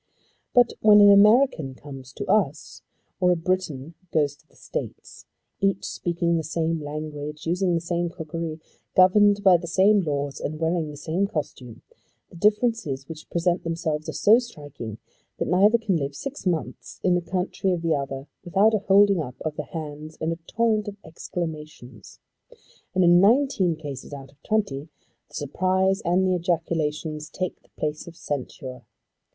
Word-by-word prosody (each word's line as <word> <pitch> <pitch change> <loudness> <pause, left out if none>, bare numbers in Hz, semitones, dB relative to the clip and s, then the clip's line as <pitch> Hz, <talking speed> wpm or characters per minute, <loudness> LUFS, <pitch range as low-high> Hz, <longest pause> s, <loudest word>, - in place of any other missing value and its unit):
But 245 -1 +5
when 210 -1 +7
an 205 0 +8
American 200 - +4
comes 135 -2 -11
to - - -5
us 185 -8 0 0.4
or 180 -1 +4
a - - +3
Briton 165 -4 -2 0.2
goes 145 -3 +1
to 155 - -30
the - - -29
States, - - -7 0.3
each 195 -1 0
speaking 170 -1 -1
the 160 - -2
same 160 +1 -1
language, 150 0 -6
using 175 +1 +1
the 165 - -1
same 175 0 -1
cookery, 165 -1 -5 0.4
governed 205 +2 +5
by 185 -3 +7
the 170 0 -8
same 195 +5 +4
laws, 145 -4 -3
and 155 +1 -4
wearing 165 -1 0
the 145 - -9
same 165 +7 -1
costume, 130 - -6 0.5
the - - -14
differences 210 - +1
which 155 -1 -10
present 175 +1 0
themselves 160 -2 -3
are - - -4
so 220 +3 +5
striking 145 - -8 0.4
that - - -2
neither 200 +6 +5
can 210 -6 0
live 140 -2 -3
six 275 - -6
months 170 -3 -3
in 180 - +3
the 175 - +2
country 185 +2 -2
of 175 -2 -2
the 165 -1 +2
other 135 -1 -3 0.2
without 200 +5 +3
a 215 - +2
holding 200 -2 +4
up 125 -4 -6
of 155 -1 -3
the 150 - -4
hands 155 -1 -7
and 160 +1 -1
a 165 - -10
torrent 225 -2 +1
of 205 0 -6
exclamations. 155 -8 -7 0.8
And 185 - +4
in 175 0 +6
nineteen 215 - +3
cases 145 -3 -8
out 135 -1 -9
of 140 +1 -30
twenty 160 -9 -1 0.4
the - - -15
surprise 185 +6 0
and 180 +2 +2
the 185 - +2
ejaculations 160 -3 -2
take 185 -1 -4
the - - -29
place 150 +1 -3
of 170 - -10
censure. 135 -4 -6
170 Hz, 170 wpm, -24 LUFS, 150-190 Hz, 0.8 s, an